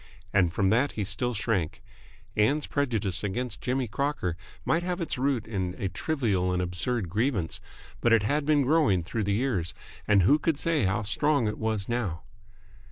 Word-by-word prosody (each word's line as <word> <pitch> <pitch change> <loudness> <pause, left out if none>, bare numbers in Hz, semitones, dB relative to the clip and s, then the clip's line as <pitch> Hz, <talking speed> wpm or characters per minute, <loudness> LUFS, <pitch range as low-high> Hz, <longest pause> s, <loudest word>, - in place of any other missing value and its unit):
And 90 -4 +4
from 95 +2 +2
that 130 +6 +2
he 105 - -2
still 110 +6 -2
shrank. 100 -7 -1 0.5
Ann's 140 +9 +2
prejudice 110 - 0
against 120 +5 -3
Jimmy 130 0 0
Crocker 125 - -1 0.3
might 165 - +2
have 180 +1 -2
its 170 - -2
root 130 -4 +1
in 95 -5 -3
a 95 - -2
trivial 105 - 0
and 90 - 0
absurd 90 +5 -1
grievance, 105 - -1 0.4
but 120 - +2
it 115 -2 +5
had 145 +7 +1
been 145 -1 +3
growing 135 - +3
through 105 +5 -2
the 100 - +1
years, 100 -7 0 0.3
and 100 -3 +5
who 145 - +5
could 160 -2 0
say 160 -7 +1
how 95 +4 0
strong 140 +4 +2
it 105 - -3
was 110 -3 -1
now? 110 -9 -2
110 Hz, 175 wpm, -28 LUFS, 95-140 Hz, 0.5 s, it